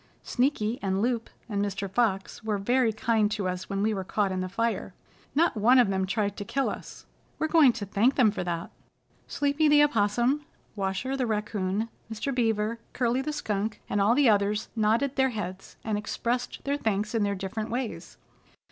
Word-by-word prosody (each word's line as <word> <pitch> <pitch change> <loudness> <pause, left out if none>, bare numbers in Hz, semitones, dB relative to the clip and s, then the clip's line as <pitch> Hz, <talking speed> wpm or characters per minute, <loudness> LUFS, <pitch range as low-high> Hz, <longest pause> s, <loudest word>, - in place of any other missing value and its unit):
Sneaky 245 -3 0
and 190 -1 0
Loup 235 +1 0 0.2
and 205 -3 -1
Mr. 200 0 -3
Fox 195 -1 -1
were 215 -2 0
very 240 +3 +2
kind 215 0 +1
to 210 -3 -2
us 185 0 -4
when 195 0 -1
we 220 +1 +2
were 190 -2 -3
caught 200 +1 0
in 185 - -2
the 185 0 -3
fire. 230 +4 -2 0.4
Not 330 0 +3
one 230 +5 +5
of 245 -5 +5
them 190 0 0
tried 205 0 -1
to - - -4
kill 270 +6 -1
us. - - -9 0.3
We're 315 - 0
going 315 -5 +6
to 215 -3 -5
thank 215 +7 +2
them 235 -6 +5
for 200 - -3
that." 170 -1 -4 0.6
Sleepy 290 +2 +1
the 295 0 +6
Opossum, 240 +2 +2 0.3
Washer 195 +7 -2
the 255 -3 -1
Raccoon, 210 -1 -1 0.2
Mr. 225 +5 -2
Beaver, 225 -2 0
Curly 245 +1 +1
the 305 - -3
Skunk 215 -6 -2
and 205 - 0
all 215 +4 +4
the 285 -1 +4
others 210 0 +2
nodded 230 +6 +1
their 265 0 +4
heads, 195 -5 -6
and 215 -2 -1
expressed 240 +3 -3
their 280 +1 0
thanks 215 -3 -1
in 225 - +1
their 200 -1 +1
different 200 +3 -4
ways. 245 0 -4
220 Hz, 190 wpm, -27 LUFS, 200-245 Hz, 0.6 s, going